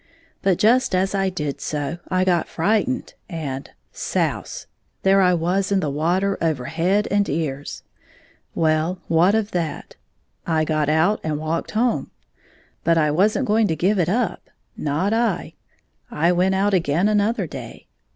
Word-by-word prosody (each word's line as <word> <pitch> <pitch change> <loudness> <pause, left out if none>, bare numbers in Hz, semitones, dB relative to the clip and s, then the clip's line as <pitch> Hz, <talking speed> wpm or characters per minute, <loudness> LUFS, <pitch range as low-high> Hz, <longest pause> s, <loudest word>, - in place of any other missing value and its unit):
But 190 -3 +2
just 240 +2 +3
as 190 +1 +1
I 195 -1 +1
did 150 -6 -4
so 150 +3 -3
I 185 0 +2
got 175 -3 +1
frightened, 220 +8 0 0.2
and 145 -6 -5 0.2
— - - -46 0.2
souse! - - -2 0.4
there 195 0 +5
I 180 -1 +4
was 180 +4 0
in 200 - +3
the 150 -5 -1
water 180 +7 0
over 155 -7 0
head 190 +9 +1
and 200 0 +2
ears. 145 -2 -3 0.7
Well, 160 +2 +1
what 175 +5 +4
of 220 -1 -1
that 170 -3 -4 0.5
1 165 -2 0
I 155 - +3
got 155 -1 0
out 160 +7 +2
and 155 -2 -1
walked 155 +2 -3
home. 240 +1 +1 0.7
But 165 0 +3
I 150 -2 +3
was 195 +8 +2
n't 270 - 0
going 220 0 +3
to 160 - 0
give 190 +5 +1
it 170 -1 +1
up 225 0 -1 0.2
— - - -47
not 160 +8 -1
I. 225 -4 0 0.6
I 170 +3 +2
went 185 +2 +2
out 200 +1 +1
again 170 +1 +2
another 210 0 +1
day. 130 -7 -9
180 Hz, 170 wpm, -22 LUFS, 155-200 Hz, 0.7 s, there